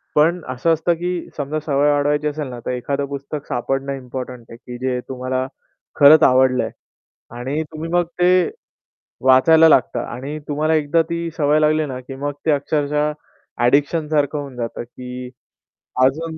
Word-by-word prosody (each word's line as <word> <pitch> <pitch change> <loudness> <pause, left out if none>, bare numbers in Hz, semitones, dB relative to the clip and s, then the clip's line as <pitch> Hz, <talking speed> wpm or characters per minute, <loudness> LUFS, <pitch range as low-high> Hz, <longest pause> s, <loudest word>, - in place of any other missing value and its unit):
पण 165 +4 +3
असं 135 +6 +1
असतं, 160 +2 +1
की 175 +1 -4
समजा 150 +2 -2
सवय 145 0 +2
वाढवायची 145 +1 +1
असेल 150 -1 -3
ना, 120 -1 -7
तर - - -1
एखादं 140 +3 -2
पुस्तक 140 +1 -6
सापडणं 135 +3 -2
इम्पोर्टंट 125 -2 -7
आहे, 115 - -10
की 125 0 -9
जे 125 -1 0
तुम्हाला 130 0 -2 0.5
खरंच 150 +2 +8
आवडलं 130 0 +4
आहे. - - -4 0.7
आणि 135 +5 -2
तुम्ही 160 +1 -6
मग 175 -1 +3 0.2
ते 180 0 +4 0.8
वाचायला 160 +5 +6
लागता 135 - +3
आणि 140 +5 -6
तुम्हाला 155 +2 0
एकदा 155 +2 +2
ती 170 0 -2
सवय 150 0 +3
लागली 155 0 +2
ना 130 -1 -5
की 135 +1 -9
मग 145 +2 -3
ते 155 - +3
अक्षरशः 150 +1 0 0.5
ॲडिक्शनसारखं 145 +3 +2
होऊन 140 -3 -7
जातं, 115 -1 -4
की 125 +1 -8 0.8
अजून 160 +4 -1
145 Hz, 160 wpm, -20 LUFS, 130-155 Hz, 0.8 s, खरंच